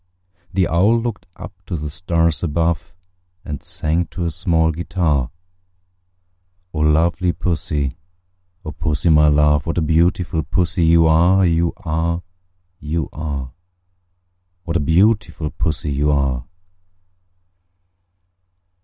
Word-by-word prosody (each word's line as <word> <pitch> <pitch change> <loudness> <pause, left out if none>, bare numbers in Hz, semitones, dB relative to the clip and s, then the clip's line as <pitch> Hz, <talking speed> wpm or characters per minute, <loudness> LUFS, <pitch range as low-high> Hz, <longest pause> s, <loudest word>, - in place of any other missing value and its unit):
The 95 -2 +1
Owl 100 +8 +3
looked 115 -2 -5
up 105 - -9
to 90 - -3
the 75 -1 -5
stars 85 -2 0
above, 85 +1 -1 0.5
And 75 -2 -5
sang 80 +2 -1
to 85 +2 -5
a 85 - -1
small 80 0 +1
guitar, 80 -5 -1 1.4
"O 75 - -3
lovely 80 +3 +2
Pussy, 75 -4 -2 0.7
O 75 - -4
Pussy, 80 +1 -1
my 75 0 +5
love, 75 0 +3
What 80 - -2
a - - +2
beautiful 85 +1 +1
Pussy 85 +3 0
you 80 0 +5
are, 85 +4 +4
You 85 0 +1
are, 85 -1 -2 0.6
You 80 -1 -3
are! 70 -4 -5 1.1
What 85 -1 -4
a - - 0
beautiful 85 0 +1
Pussy 75 -1 -2
you 70 +2 0
are!" 65 -3 0
80 Hz, 120 wpm, -19 LUFS, 75-85 Hz, 1.4 s, my